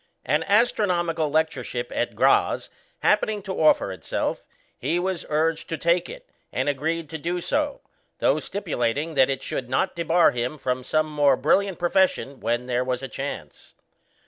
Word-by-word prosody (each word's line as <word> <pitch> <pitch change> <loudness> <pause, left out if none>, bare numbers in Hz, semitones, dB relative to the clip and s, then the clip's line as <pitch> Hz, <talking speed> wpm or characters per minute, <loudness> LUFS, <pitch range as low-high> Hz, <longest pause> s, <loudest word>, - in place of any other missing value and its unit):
An 150 +5 +1
astronomical 180 -7 +2
lectureship 135 -6 -1
at - - -2
Graz - - +2 0.3
happening 210 -2 +2
to 190 - -4
offer 155 -10 +4
itself, 95 - -3 0.3
he 155 +7 -1
was 185 -1 -2
urged 160 +1 0
to 165 - -2
take 170 +2 +1
it, - - -10 0.2
and - - -1
agreed 155 +3 -1
to 160 - -5
do 175 +4 -2
so, 290 - -1 0.4
though - - +2
stipulating 155 - -2
that 135 -2 +4
it 135 - -2
should 125 -2 -4
not 185 +9 0
debar 170 0 +4
him 125 +5 -3
from 125 -2 -2
some 155 +4 +1
more 145 -3 +3
brilliant 195 +6 +2
profession 175 -6 +1
when 120 +2 -1
there 125 0 0
was 125 0 -2
a - - -3
chance. 120 - -7
155 Hz, 160 wpm, -24 LUFS, 130-175 Hz, 0.4 s, offer